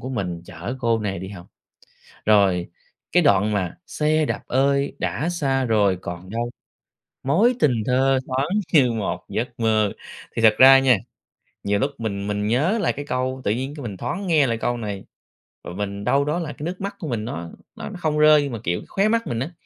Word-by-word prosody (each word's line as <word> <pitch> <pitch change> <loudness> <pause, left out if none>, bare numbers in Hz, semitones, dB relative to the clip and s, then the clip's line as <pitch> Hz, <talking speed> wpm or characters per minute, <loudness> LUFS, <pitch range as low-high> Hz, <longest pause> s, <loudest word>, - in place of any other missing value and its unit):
của 130 - -6
mình 90 -9 -3
chở 90 +8 -6
cô 115 -2 +2
này 100 -3 -3
đi 95 +2 -7
học. 95 -3 -10 0.8
Rồi 100 -5 +3 0.4
cái 180 - +5
đoạn 105 - +3
mà 95 -4 -2
"xe 155 +1 +1
đạp - - -3
ơi, 140 +2 +1
đã 160 - -2
xa 135 -6 0
rồi 105 -5 +2
còn 90 +2 -7
đâu, 120 +2 -2 0.7
mối 195 - +3
tình 120 - +2
thơ 130 +2 +2
thoáng 130 +2 -1 0.3
như 135 -6 +5
một 110 -4 -3
giấc 120 +2 -4
mơ", 110 -2 +2 0.4
thì - - -1
thật 110 -1 +6
ra 135 +1 +9
nha, 130 -3 +4 0.7
nhiều 100 0 +1
lúc 135 +8 0
mình 100 -3 -3
mình 105 0 -1
nhớ 145 - +1
lại - - +1
cái 145 - -6
câu, 130 +1 -2
tự - - +1
nhiên 130 +6 -2
cái 150 - -8
mình 105 -6 -6
thoáng 190 - -4
nghe 155 -5 +4
lại 115 -2 -1
câu 120 +1 -1
này, 105 -4 -5 0.6
và - - -7
mình 100 +1 -4
đâu 140 +6 +2
đó 150 +4 -1
là 155 -4 -4
cái 145 - -10
nước 180 +3 -5
mắt 200 +1 -4
của 170 - -5
mình 115 -5 -2
nó 85 -7 -5 0.3
nó - - -7
nó - - -9
không 155 -3 -1
rơi 150 0 +7
nhưng 140 - -4
mà, 115 - -4
kiểu, 85 +1 -1
khóe 195 +2 +1
mắt 230 +1 +1
mình 115 - -2
á, 135 +8 -3
120 Hz, 215 wpm, -22 LUFS, 105-145 Hz, 0.8 s, ra